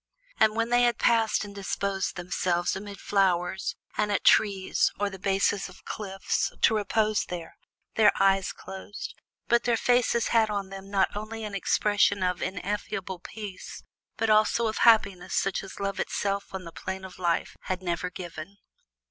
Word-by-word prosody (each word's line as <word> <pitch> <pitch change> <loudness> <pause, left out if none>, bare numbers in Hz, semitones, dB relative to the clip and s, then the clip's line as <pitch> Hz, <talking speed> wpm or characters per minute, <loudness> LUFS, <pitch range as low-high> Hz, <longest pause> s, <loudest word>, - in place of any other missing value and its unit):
And 215 0 +4
when 230 +1 0
they 245 0 +4
had 240 -1 +3
passed 225 -2 +3
and 205 - -10
disposed 200 0 -2
themselves 175 0 -1
amid 200 +1 -7
flowers 190 -2 +1 0.2
and 210 -1 0
at 200 - 0
trees 195 -3 +3
or 205 0 0
the 190 - -9
bases 195 +1 +1
of 185 - -16
cliffs, 195 -2 -2
to 220 - +4
repose 215 0 +1
there, 170 -2 -7 0.4
their 220 - +6
eyes 195 -1 +3
were - - -15
closed, 195 +2 -7 0.3
but 235 0 +3
their 240 -1 +3
faces 245 -1 +2
had 225 -2 +3
on 200 -2 -3
them 195 0 -9
not 195 -1 +1
only 220 +2 -5
an 210 -1 -5
expression 200 0 +2
of 180 -1 0
ineffable 190 0 -3
peace, 205 0 -8 0.3
but 225 -1 +1
also 215 +2 +4
of 220 -1 -1
happiness 200 -6 +4
such 195 0 0
as 195 - -10
Love 200 -1 -2
itself 200 0 -2
on 190 -1 -5
the 165 - -9
Plain 190 +2 -6
of 185 -1 -11
Life 170 -2 0
had 185 0 -3
never 175 0 -2
given. 175 +1 -8
200 Hz, 170 wpm, -27 LUFS, 190-215 Hz, 0.4 s, their